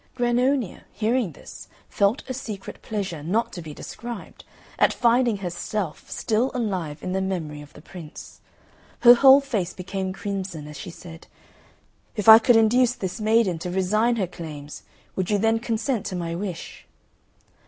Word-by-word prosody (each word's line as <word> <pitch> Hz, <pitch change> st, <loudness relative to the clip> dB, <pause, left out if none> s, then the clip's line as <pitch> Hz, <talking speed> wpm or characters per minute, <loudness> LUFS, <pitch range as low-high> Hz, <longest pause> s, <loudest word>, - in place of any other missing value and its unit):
Grannonia, 245 Hz, -2 st, 0 dB
hearing 220 Hz, -, 0 dB
this, -, -, -12 dB, 0.2 s
felt 200 Hz, +6 st, 0 dB
a 260 Hz, -, -3 dB
secret 215 Hz, -6 st, -7 dB
pleasure 195 Hz, -8 st, -4 dB
not 205 Hz, +10 st, -1 dB
to 175 Hz, -, -6 dB
be 160 Hz, -2 st, -8 dB
described 235 Hz, +8 st, -8 dB, 0.4 s
at -, -, +5 dB
finding 240 Hz, -2 st, +2 dB
herself 180 Hz, -1 st, -4 dB
still 230 Hz, +3 st, 0 dB
alive 185 Hz, -11 st, -3 dB
in 185 Hz, -, -3 dB
the 190 Hz, +1 st, 0 dB
memory 165 Hz, -6 st, -3 dB
of 145 Hz, 0 st, -13 dB
the -, -, -14 dB
Prince. 170 Hz, -5 st, -11 dB, 0.6 s
Her 240 Hz, 0 st, +10 dB
whole 270 Hz, +3 st, +7 dB
face 215 Hz, -11 st, -2 dB
became 190 Hz, 0 st, -4 dB
crimson 190 Hz, -5 st, -5 dB
as 150 Hz, -, -10 dB
she 185 Hz, -, -7 dB
said, 165 Hz, -1 st, -12 dB, 0.9 s
"If 210 Hz, -1 st, -3 dB
I 220 Hz, 0 st, +12 dB
could 240 Hz, +1 st, +4 dB
induce 240 Hz, +3 st, +4 dB
this 190 Hz, +1 st, -5 dB
maiden 215 Hz, -5 st, +2 dB
to 180 Hz, -, -4 dB
resign 210 Hz, +6 st, +1 dB
her 205 Hz, -5 st, 0 dB
claims, 155 Hz, -4 st, -9 dB, 0.3 s
would 185 Hz, -2 st, -2 dB
you 210 Hz, -, +3 dB
then 225 Hz, +2 st, +2 dB
consent 225 Hz, -1 st, -2 dB
to 185 Hz, -, -4 dB
my 170 Hz, -2 st, -3 dB
wish?" 180 Hz, -1 st, -6 dB
200 Hz, 160 wpm, -24 LUFS, 175-230 Hz, 0.9 s, I